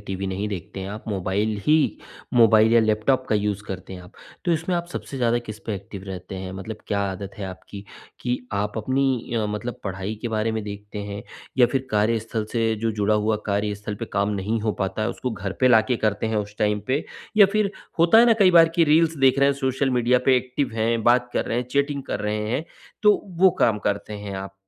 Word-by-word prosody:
TV 95 Hz, 0 st, -3 dB
नहीं 95 Hz, +2 st, -2 dB
देखते 100 Hz, 0 st, -6 dB
है 95 Hz, -, -5 dB
आप। 105 Hz, +4 st, -8 dB
मोबाइल 100 Hz, +2 st, -1 dB
ही 155 Hz, -, +6 dB, 0.6 s
मोबाइल 110 Hz, -1 st, +6 dB
या 115 Hz, -, +6 dB
लैपटॉप 110 Hz, +5 st, +1 dB
का -, -, +2 dB
यूज़ 105 Hz, -1 st, -1 dB
करते 95 Hz, 0 st, -7 dB
हैं 90 Hz, -, -8 dB
आप। 90 Hz, -, -15 dB, 0.3 s
तो 175 Hz, -, +2 dB
इसमें 165 Hz, +3 st, -1 dB
आप 170 Hz, 0 st, -3 dB
सबसे 140 Hz, -, -6 dB
ज़्यादा 120 Hz, -2 st, +2 dB
किस 110 Hz, -3 st, -8 dB
पे 110 Hz, -, -1 dB
एक्टिव 100 Hz, 0 st, -8 dB
रहते 95 Hz, -1 st, -7 dB
है? 95 Hz, 0 st, -6 dB
मतलब 95 Hz, +3 st, -6 dB
क्या 100 Hz, -1 st, 0 dB
आदत 95 Hz, +1 st, -6 dB
है 100 Hz, -, -4 dB
आपकी 100 Hz, +2 st, -9 dB, 0.4 s
कि 125 Hz, 0 st, -1 dB
आप 105 Hz, +1 st, -2 dB
अपनी 130 Hz, +1 st, 0 dB
अ, 110 Hz, -2 st, 0 dB
मतलब 105 Hz, +3 st, -4 dB
पढ़ाई 95 Hz, +2 st, -4 dB
के 120 Hz, -, -2 dB
बारे 110 Hz, 0 st, 0 dB
में 110 Hz, -1 st, -2 dB
देखते 105 Hz, 0 st, -7 dB
हैं? 100 Hz, 0 st, -5 dB, 0.4 s
या 125 Hz, -, +7 dB
फिर 130 Hz, +1 st, -2 dB
कार्यस्थल 110 Hz, +1 st, 0 dB
से 115 Hz, -2 st, +1 dB
जो 115 Hz, +1 st, -1 dB
जुड़ा 105 Hz, 0 st, +1 dB
हुआ 105 Hz, +1 st, +1 dB
कार्यस्थल 105 Hz, 0 st, -2 dB
पे 115 Hz, -, -1 dB
काम 100 Hz, +1 st, +1 dB
नहीं 110 Hz, +3 st, -1 dB
हो 110 Hz, 0 st, 0 dB
पाता 95 Hz, +2 st, -2 dB
है 110 Hz, -, 0 dB
उसको 125 Hz, -, -4 dB
घर 100 Hz, -2 st, -4 dB
पे 130 Hz, -, +5 dB
लाके 115 Hz, +1 st, +4 dB
करते 105 Hz, +1 st, 0 dB
हैं 110 Hz, -1 st, -1 dB
उस 105 Hz, 0 st, -3 dB
टाइम 105 Hz, -1 st, +1 dB
पे? 135 Hz, +4 st, 0 dB, 0.3 s
या 205 Hz, -, +8 dB
फिर 215 Hz, -2 st, +2 dB, 0.3 s
होता 170 Hz, +7 st, +6 dB
है 235 Hz, -, +7 dB
ना 235 Hz, -, +6 dB
कई 190 Hz, -2 st, +7 dB
बार 165 Hz, -2 st, +7 dB
की 170 Hz, -, +4 dB
रील्स 160 Hz, +1 st, +3 dB
देख 135 Hz, -1 st, +4 dB
रहे 140 Hz, 0 st, +5 dB
हैं -, -, +3 dB
सोशल 135 Hz, 0 st, 0 dB
मीडिया 125 Hz, 0 st, +3 dB
पे, 130 Hz, -1 st, +6 dB
एक्टिव 130 Hz, +2 st, -1 dB
हैं, 115 Hz, +1 st, 0 dB
बात 120 Hz, 0 st, +4 dB
कर -, -, 0 dB
रहे 115 Hz, -, -2 dB
हैं, 125 Hz, -, -2 dB
चैटिंग 140 Hz, +1 st, 0 dB
कर 105 Hz, -, -4 dB
रहे 105 Hz, 0 st, -2 dB
हैं, 135 Hz, +6 st, -1 dB, 0.4 s
तो 210 Hz, -1 st, +6 dB, 0.2 s
वो 190 Hz, +1 st, +7 dB
काम 110 Hz, -3 st, +3 dB
करते 100 Hz, +1 st, -3 dB
हैं 100 Hz, -1 st, -6 dB
आप? 95 Hz, 0 st, -7 dB
110 Hz, 230 wpm, -23 LUFS, 100-125 Hz, 0.6 s, या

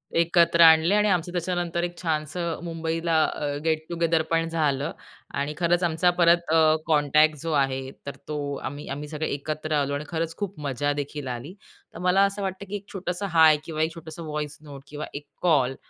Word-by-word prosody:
एकत्र 170 Hz, 0 st, +4 dB
आणले 160 Hz, +4 st, +7 dB
आणि 210 Hz, 0 st, +3 dB
आमचं 175 Hz, -1 st, 0 dB
त्याच्यानंतर 175 Hz, -1 st, -2 dB
एक 175 Hz, 0 st, -4 dB
छानसं 160 Hz, +1 st, -2 dB
मुंबईला 165 Hz, -1 st, 0 dB
अ, 145 Hz, -1 st, -3 dB
गेट 160 Hz, -1 st, 0 dB
टुगेदर 170 Hz, -1 st, +1 dB
पण 165 Hz, 0 st, +1 dB
झालं. 145 Hz, -4 st, 0 dB, 0.4 s
आणि 145 Hz, +2 st, -2 dB
खरंच 175 Hz, +1 st, +2 dB
आमचा 170 Hz, +1 st, +2 dB
परत 170 Hz, -1 st, +4 dB
अ, 155 Hz, -1 st, +5 dB
कॉन्टॅक्ट 150 Hz, 0 st, +4 dB
जो 165 Hz, -, -3 dB
आहे 135 Hz, -2 st, 0 dB, 0.2 s
तर 140 Hz, -, -6 dB
तो 150 Hz, -1 st, -3 dB, 0.3 s
आम्ही 145 Hz, +2 st, -6 dB
आम्ही 145 Hz, +2 st, -5 dB
सगळे 155 Hz, +1 st, -3 dB
एकत्र 155 Hz, +2 st, -4 dB
आलो 140 Hz, -1 st, 0 dB
आणि 145 Hz, +2 st, -3 dB
खरंच 165 Hz, -1 st, -2 dB
खूप 200 Hz, -5 st, -5 dB
मजा 145 Hz, 0 st, -1 dB
देखील 145 Hz, -1 st, -5 dB
आली. 125 Hz, +8 st, -5 dB, 0.4 s
तर -, -, -9 dB
मला 180 Hz, +2 st, +3 dB
असं 200 Hz, +1 st, -3 dB
वाटतं 190 Hz, 0 st, -4 dB
की 205 Hz, -, -3 dB
एक 200 Hz, -1 st, -6 dB
छोटंसं 185 Hz, +1 st, -3 dB
हाय 160 Hz, -2 st, +6 dB
किंवा 155 Hz, -1 st, -3 dB
एक 160 Hz, +1 st, -1 dB
छोटंसं 165 Hz, 0 st, -9 dB
व्हॉइस 150 Hz, -1 st, -4 dB
नोट 140 Hz, -2 st, -11 dB
किंवा 150 Hz, +1 st, -5 dB
एक 145 Hz, +1 st, -7 dB, 0.2 s
कॉल 135 Hz, -7 st, +3 dB
160 Hz, 190 wpm, -25 LUFS, 150-170 Hz, 0.4 s, आणले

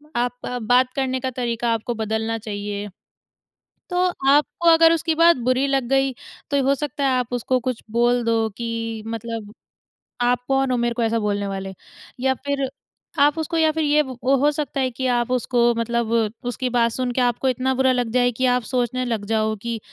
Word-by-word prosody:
आप 245 Hz, +1 st, -1 dB
आप 250 Hz, -1 st, -4 dB
बात 250 Hz, +3 st, +3 dB
करने 260 Hz, -2 st, -1 dB
का 260 Hz, +1 st, -2 dB
तरीका 235 Hz, -1 st, -1 dB
आपको 230 Hz, +2 st, -2 dB
बदलना 220 Hz, +1 st, -1 dB
चाहिए। 205 Hz, -1 st, -5 dB, 1.0 s
तो 360 Hz, +1 st, +2 dB, 0.2 s
आपको 300 Hz, +4 st, +2 dB
अगर 325 Hz, 0 st, +6 dB
उसकी 325 Hz, 0 st, 0 dB
बात 335 Hz, +1 st, +5 dB
बुरी 255 Hz, +3 st, +1 dB
लग 270 Hz, -3 st, 0 dB
गई, 270 Hz, 0 st, +2 dB, 0.4 s
तो 280 Hz, -1 st, +2 dB
हो 275 Hz, -, +4 dB
सकता 280 Hz, 0 st, -3 dB
है 270 Hz, -, +3 dB
आप 245 Hz, -1 st, -3 dB
उसको 245 Hz, +1 st, 0 dB
कुछ 255 Hz, -1 st, -3 dB
बोल 240 Hz, +1 st, +2 dB
दो 225 Hz, -1 st, +1 dB
कि 230 Hz, -1 st, -4 dB
मतलब 225 Hz, -1 st, -6 dB, 0.7 s
आप 245 Hz, 0 st, +2 dB
कौन 270 Hz, -1 st, +1 dB
हो 250 Hz, -, +1 dB
मेरे 240 Hz, 0 st, 0 dB
को 235 Hz, -, -1 dB
ऐसा 230 Hz, 0 st, +1 dB
बोलने 205 Hz, -1 st, -1 dB
वाले? 195 Hz, 0 st, -5 dB, 0.5 s
या 265 Hz, +1 st, +2 dB
फिर 280 Hz, -2 st, -1 dB, 0.5 s
आप 290 Hz, +2 st, +4 dB
उसको 320 Hz, +1 st, -2 dB
या 320 Hz, -1 st, +4 dB
फिर 320 Hz, 0 st, -1 dB
ये 300 Hz, 0 st, +4 dB, 0.2 s
हो 275 Hz, +3 st, +3 dB
सकता 290 Hz, -2 st, -3 dB
है 260 Hz, -, +1 dB
कि 260 Hz, +2 st, -4 dB
आप 240 Hz, +1 st, -1 dB
उसको 240 Hz, -1 st, +2 dB
मतलब 230 Hz, 0 st, -1 dB, 0.4 s
उसकी 250 Hz, +2 st, -3 dB
बात 235 Hz, -1 st, +2 dB
सुन 250 Hz, +1 st, -2 dB
के 255 Hz, -, 0 dB
आपको 245 Hz, +2 st, +1 dB
इतना 255 Hz, +1 st, 0 dB
बुरा 260 Hz, 0 st, +3 dB
लग 245 Hz, -2 st, 0 dB
जाए 245 Hz, 0 st, +3 dB
कि 260 Hz, -, +1 dB
आप 250 Hz, -, +1 dB
सोचने 255 Hz, +1 st, -1 dB
लग 225 Hz, -4 st, -2 dB
जाओ 220 Hz, 0 st, +1 dB
कि 235 Hz, -1 st, -3 dB
245 Hz, 195 wpm, -22 LUFS, 230-270 Hz, 1.0 s, अगर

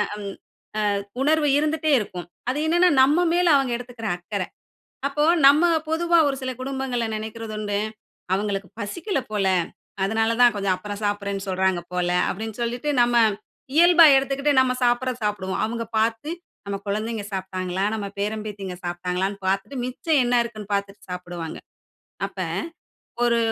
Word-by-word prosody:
அம் 205 Hz, -1 st, -6 dB, 0.7 s
அ -, -, -1 dB, 0.2 s
உணர்வு 305 Hz, +2 st, +3 dB
இருந்துட்டே 310 Hz, +1 st, 0 dB
இருக்கும். 180 Hz, -4 st, -6 dB, 0.2 s
அது 280 Hz, -, -2 dB
என்னன்னா, 345 Hz, +3 st, +4 dB
நம்ம 300 Hz, +7 st, +4 dB
மேல 355 Hz, +1 st, +3 dB
அவுங்க 270 Hz, -3 st, +2 dB
எடுத்துக்கிற 240 Hz, -3 st, -6 dB
அக்கற. 185 Hz, +2 st, -3 dB, 0.7 s
அப்போ 295 Hz, +2 st, 0 dB, 0.2 s
நம்ம 295 Hz, +4 st, +5 dB, 0.2 s
பொதுவா 340 Hz, +1 st, +3 dB
ஒரு 275 Hz, -, -1 dB
சில 260 Hz, -, -2 dB
குடும்பங்கள 265 Hz, -2 st, -2 dB
நினைக்கிறதுண்டு. 215 Hz, -1 st, -4 dB, 0.6 s
அவுங்களுக்கு 195 Hz, -1 st, -2 dB
பசிக்கல 320 Hz, -, -2 dB
போல. 205 Hz, -2 st, +1 dB, 0.6 s
அதனால 225 Hz, +3 st, +1 dB
தான் 240 Hz, -2 st, +6 dB
கொஞ்சம் 195 Hz, -2 st, +1 dB
அப்புறம் 205 Hz, +2 st, -7 dB
சாப்பிட்றேன்னு 200 Hz, -1 st, -2 dB
சொல்றாங்க 190 Hz, -1 st, +1 dB
போல, 180 Hz, -1 st, 0 dB, 0.2 s
அப்பிடின்னு 220 Hz, +3 st, -5 dB
சொல்லிட்டு 245 Hz, +5 st, -2 dB
நம்ம 240 Hz, 0 st, +2 dB, 0.6 s
இயல்பா 345 Hz, 0 st, +8 dB
எடுத்துக்கிட்டு 275 Hz, +2 st, +1 dB
நம்ம 260 Hz, -1 st, +3 dB
சாப்பிட்றத 245 Hz, +1 st, +1 dB
சாப்பிடுவோம். 190 Hz, -2 st, -2 dB
அவுங்க 230 Hz, +1 st, -3 dB
பார்த்து 225 Hz, +7 st, 0 dB, 0.4 s
நம்ம 200 Hz, 0 st, -2 dB
குழந்தைங்க 215 Hz, +1 st, -2 dB
சாப்பிட்டாங்களா? 185 Hz, 0 st, -2 dB
நம்ம 210 Hz, -2 st, -3 dB
பேரம் 210 Hz, +1 st, -2 dB
பேத்திங்க 195 Hz, -3 st, -6 dB
சாப்பிட்டாங்களான்னு 180 Hz, +3 st, -2 dB
பார்த்துட்டு 195 Hz, +8 st, -1 dB
மிச்சம் 275 Hz, +4 st, +1 dB
என்ன 245 Hz, -, +1 dB
இருக்குன்னு 215 Hz, -3 st, -7 dB
பார்த்துட்டு 200 Hz, 0 st, -3 dB
சாப்பிடுவாங்க. 175 Hz, -2 st, -6 dB, 0.7 s
அப்ப, -, -, -9 dB, 0.8 s
ஒரு 235 Hz, -1 st, +3 dB
220 Hz, 140 wpm, -24 LUFS, 195-270 Hz, 0.8 s, இயல்பா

